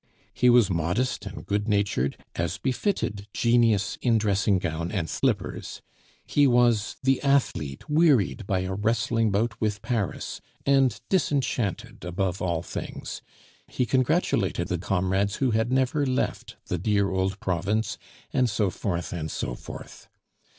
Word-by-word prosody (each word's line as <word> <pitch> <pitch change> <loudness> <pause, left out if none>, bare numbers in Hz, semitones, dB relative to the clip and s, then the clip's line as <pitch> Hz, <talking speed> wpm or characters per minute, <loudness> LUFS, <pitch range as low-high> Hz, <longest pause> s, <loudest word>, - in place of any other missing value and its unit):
He 125 - +4
was 120 -4 +6
modest 90 +9 -1
and 95 - -8
good 100 +1 -1
natured, 100 - +1 0.2
as 85 +3 -1
befitted 125 - -1
genius 115 -4 +2
in 115 -2 +3
dressing 100 -2 +2
gown 85 0 -3
and 90 -6 -1
slippers; - - -2 0.4
he 145 -1 +4
was 120 -3 +3
the 135 0 +2
athlete, 130 - 0
wearied 140 - +3
by 95 -3 +1
a 95 +1 -3
wrestling 115 +2 +1
bout 105 +3 -1
with 105 -1 -1
Paris, 110 -6 -2 0.2
and 135 -4 +3
disenchanted 135 - -1
above 90 +1 -2
all 85 -2 -1
things; - - -6 0.5
he 125 - -1
congratulated 130 - +1
the - - -1
comrades 95 +2 0
who 130 -3 +1
had 110 +2 +1
never 130 +3 +2
left 130 -2 -1
the 90 - -2
dear 100 +1 +1
old 95 +1 -1
province, 100 +6 -1 0.3
and 130 -2 +3
so 105 -2 +1
forth, 90 -3 -3
and 80 -3 -3
so - - -3
forth. - - -10
105 Hz, 140 wpm, -26 LUFS, 95-125 Hz, 0.5 s, was